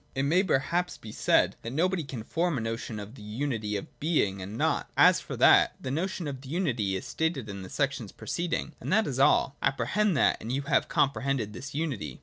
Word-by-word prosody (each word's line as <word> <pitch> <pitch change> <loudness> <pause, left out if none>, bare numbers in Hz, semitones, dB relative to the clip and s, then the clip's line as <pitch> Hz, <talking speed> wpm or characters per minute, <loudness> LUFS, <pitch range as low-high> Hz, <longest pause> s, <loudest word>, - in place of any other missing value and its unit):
(3) 135 - 0
It - - 0
may 165 +7 +3
perhaps 175 +1 0
be 110 - -10
said - - +2
that 115 - -6
nobody 175 +3 +1
can 130 -5 -6
form 170 +4 0
a - - -2
notion 115 -1 -4
of 105 +2 -8
the 135 - -13
unity 110 -1 -3
of 100 - -10
Being 105 - +1
and 100 +4 -6
Nought. - - 0
As - - +6
for - - -7
that, - - +6
the 130 - -4
notion 170 +2 -2
of 135 -2 -5
the 135 - -11
unity 130 - 0
is 95 - -4
stated 160 -8 -2
in 100 -1 -6
the 95 - -8
sections 135 -7 -2
preced 175 0 -4
ing, 160 - -2
and - - -5
that 215 +2 +4
is 130 -2 -3
all: 140 0 +4
apprehend 145 - +1
that, - - +3
and 115 - -5
you 140 +2 -1
have 140 -1 +2
comprehended 135 -5 0
this 135 +3 -8
unity. 130 - -3
135 Hz, 225 wpm, -28 LUFS, 110-160 Hz, -, As